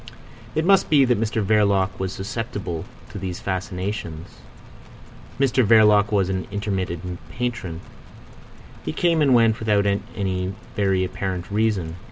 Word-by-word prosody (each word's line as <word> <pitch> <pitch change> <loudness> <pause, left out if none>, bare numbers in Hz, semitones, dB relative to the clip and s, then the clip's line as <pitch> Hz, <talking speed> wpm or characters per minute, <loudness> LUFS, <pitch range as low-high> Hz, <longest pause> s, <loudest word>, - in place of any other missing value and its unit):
It 160 - +1
must 195 +1 +4
be 145 -4 +5
that 120 -4 +1
Mr 110 -1 0
Verloc 100 -2 +3
was 95 -1 -2
susceptible 100 -3 -4 0.3
to 105 - -6
these 95 -2 -4
fascinations. 90 -3 -4 1.1
Mr 135 -2 +3
Verloc 105 -2 +5
was 100 -3 +2
an 95 -1 -3
intermittent 95 -4 -3
patron. 120 -9 -4 1.0
He - - -3
came 170 -2 +2
and 135 -4 +5
went 115 -2 +4
without 105 -2 +2
any 95 -2 -2 0.2
very 95 -2 +2
apparent 95 0 -4
reason. 100 -6 0
100 Hz, 130 wpm, -23 LUFS, 95-110 Hz, 1.1 s, be